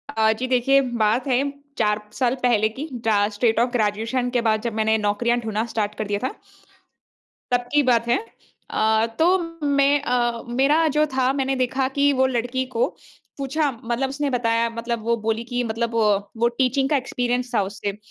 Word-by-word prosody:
अ, 220 0 +4
जी। 250 +4 -4
देखिए 260 +2 +3 0.2
बात 230 +6 +1
है 255 -1 +2 0.4
4 210 -1 +1
साल 255 -1 +1
पहले 220 -3 +3
की 295 +4 -5 0.2
जा 205 -2 +3
स्टेट 225 +1 +1
ऑफ़ 240 +1 +2
ग्रेजुएशन 230 +2 0
के 240 - +3
बाद 215 -1 +1
जब 235 -2 -3
मैंने 220 0 +2
नौकरियाँ 215 +3 +1
ढूँढना 220 0 -2
स्टार्ट 210 -1 -1
कर 215 - -3
दिया 205 0 -1
था। - - -5 1.2
तब 245 0 +2
की 295 0 +4
बात 235 -3 +2
है। 240 - +3 0.5
अ, 220 +1 +2
तो 360 +4 +4 0.3
मैं 280 0 +3
अ, 240 -3 0
मेरा 280 +6 +3
जो 305 - +5
था 260 0 +2
मैंने 270 -1 -1
देखा 260 +1 0
कि 285 0 +4
वो 260 0 +3
लड़की 250 +1 -1
को 230 - +3 0.5
पूछा 280 +2 0
मतलब 240 +3 -1
उसने 280 +1 -2
बताया 230 -1 +1
मतलब 230 0 -4
वो 235 0 +1
बोली 225 +1 0
कि 245 0 -2
मतलब 230 +1 -2 0.4
वो 235 +1 +3
टीचिंग 265 +1 +2
का 295 - +4
एक्सपीरियंस 250 -1 -2
था 205 - +3
उसे। 200 +1 -4
240 Hz, 180 wpm, -23 LUFS, 220-265 Hz, 1.2 s, जो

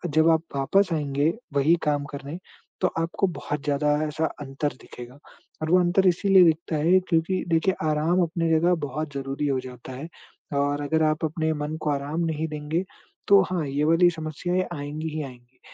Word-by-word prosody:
जब 160 +1 +5
आप 160 -1 +4
वापस 190 +9 +2
आएँगे 145 -1 +1 0.2
वही 145 +3 +4
काम 145 -2 +1
करने 140 +3 -7 0.4
तो - - +4
आपको 165 +4 0
बहुत 150 -4 -4
ज़्यादा 145 0 +1 0.2
ऐसा 155 +1 -1 0.2
अंतर 140 +1 -3
दिखेगा 125 +2 -11 0.4
और 155 - -2
वो 180 - +6
अंतर 180 +2 +3
इसीलिए 190 +1 +5
दिखता 160 0 +1
है 170 +5 +4
क्योंकि 170 +3 +1
देखिए, 165 +3 +2
आराम 155 +4 +2
अपनी 165 0 -1
जगह 165 +2 +3
बहुत 145 +2 -5
ज़रूरी 135 +1 -3
हो 135 -2 +1
जाता 125 0 -10
है। 135 +5 -7 0.5
और 145 +1 0
अगर 160 +2 +1
आप 155 +1 +1
अपने 160 0 -1
मन 150 +1 -4
को 150 - -1
आराम 145 +3 -2
नहीं 160 0 -2
देंगे, 150 +3 -2 0.5
तो 200 -1 +8
हाँ, 175 -4 -1
ये 140 +2 -1
वाली 165 +3 +5
समस्याएँ 170 +3 -2
आएँगी 150 +1 -4
ही 155 - -2
आएँगी। 125 -1 -13
155 Hz, 180 wpm, -25 LUFS, 145-165 Hz, 0.5 s, तो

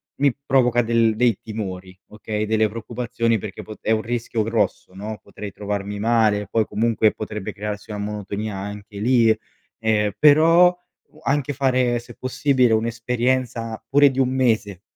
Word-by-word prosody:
mi 140 -2 +2
provoca 125 -3 +3
del 115 -1 +2
dei 115 -2 +2
timori, 95 -4 -6
okay, 105 0 -4
delle 110 0 +2
preoccupazioni 115 +1 -2
perché 100 -1 -7
pot 110 - -10
è - - -1
un 110 -1 +2
rischio 115 0 -2
grosso, 105 -4 -1
no, 105 +2 -6
potrei 105 -1 -9
trovarmi 100 0 -4
male, 110 -2 +2
poi 110 -1 +1
comunque, 110 0 +2
potrebbe 105 -2 -6
crearsi 105 +1 -6
una 105 - -4
monotonia 105 0 -4
anche 105 +1 -8
lì. 115 0 +3 0.4
Ehm, 105 -2 +1
però 165 +6 +6 0.3
u 155 - -20
anche 145 +1 0
fare 130 -3 +1
se 120 - -13
possibile, 130 -2 +1
un'esperienza, 115 0 -1
pure 145 +1 +5
di 130 - -7
1 130 -1 +3
mese, 110 -7 0
110 Hz, 150 wpm, -22 LUFS, 105-125 Hz, 0.4 s, però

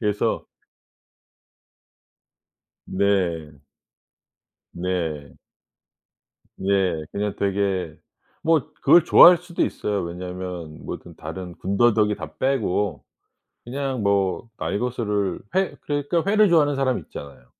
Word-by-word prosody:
그래서 105 -2 0 2.4
네. 85 -7 0 1.1
네. 85 -5 -3 1.3
예 95 -5 +1
그냥 105 0 -2
되게 95 -5 -1 0.5
뭐 160 -4 +1
그걸 170 -2 +6
좋아할 175 0 +8
수도 175 0 -3
있어요. 105 -2 -2
왜냐하면 90 -2 -6
뭐든 - - -8
다른 90 -2 -7
군더더기 105 +2 +2
다 - - -8
빼고 105 - 0 0.6
그냥 135 -1 -3
뭐 100 +2 +1
날거스를 105 -5 -1 0.2
회 190 0 +1
그러니까 145 +4 -1
회를 210 0 +4
좋아하는 150 -4 +4
사람 130 -2 +1
있잖아요. 70 -3 -11
100 Hz, 205 characters per minute, -23 LUFS, 90-130 Hz, 2.4 s, 좋아할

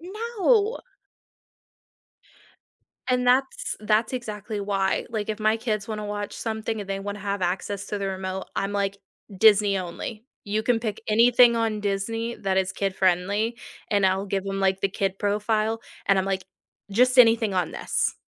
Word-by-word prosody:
No. 435 +3 +1 2.3
And 250 -1 +1
that's 265 +2 +1
that's 215 +3 +1
exactly 215 -3 -4
why, 195 -1 0
like, 220 -2 -3
if 215 - -2
my 215 +1 +2
kids 215 -3 -2
wanna 210 -1 -4
watch 205 0 -4
something 220 -1 -3
and 200 - -7
they 195 0 -2
wanna 205 +1 -5
have 200 -1 -3
access 195 +2 -2
to 205 - -3
the 195 - -2
remote, 190 0 -4
I'm, 195 +1 -1
like, 200 -1 -1 0.4
"Disney 205 -1 +5
only, 190 +5 -5 0.2
you 210 +2 -1
can 240 -1 +1
pick 220 -3 -3
anything 235 +2 +6
on 225 -2 0
Disney 225 +4 -2
that 190 -1 -1
is 190 0 +1
kid-friendly," 195 +4 0 0.3
and 200 -2 +3
I'll 190 +2 0
give 195 0 -2
them, 195 0 -3
like, 190 0 +1
the 195 - +1
kid 195 0 -2
profile, 215 +2 0 0.2
and 195 -1 +4
I'm, 190 - +1
like, 190 -1 -2 0.5
"Just 250 +5 +3
anything 225 -3 +6
on 180 -3 -1
this - - -1
210 Hz, 160 wpm, -25 LUFS, 195-225 Hz, 2.3 s, anything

